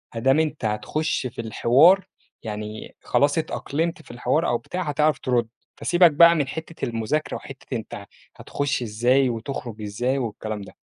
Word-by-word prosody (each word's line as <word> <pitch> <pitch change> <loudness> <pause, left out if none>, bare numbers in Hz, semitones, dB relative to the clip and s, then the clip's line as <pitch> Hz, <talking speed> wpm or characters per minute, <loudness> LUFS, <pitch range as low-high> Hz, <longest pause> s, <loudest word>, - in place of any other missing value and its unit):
ما - - -2
دام 135 +5 +4
أنت 155 -5 -1
هتخُش 120 +8 -1
في 115 - -7
الحوار، 145 - +4 0.4
يعني 105 0 -6
خلاص 145 +2 +2
اتأقلمت 160 +1 -2
في - - -13
الحوار 125 +7 0
أو 120 - +1
بتاع 185 +9 -5
هتعرف 150 -1 +1
ترُد، 125 -4 0 0.3
فسيبك 175 -1 +4
بقى 170 +3 +7
من 145 -4 0
حتّة 160 +3 -5
المذاكرة 120 +6 -2
وحتّة 135 -2 -8
أنت 105 -2 -8 0.3
هتخُش 145 -3 -2
إزاي 120 +4 +2
وتخرج 115 -2 -5
إزاي 120 +6 -1
والكلام 110 -4 -4
ده. 100 - -11
130 Hz, 155 wpm, -24 LUFS, 115-155 Hz, 0.4 s, بقى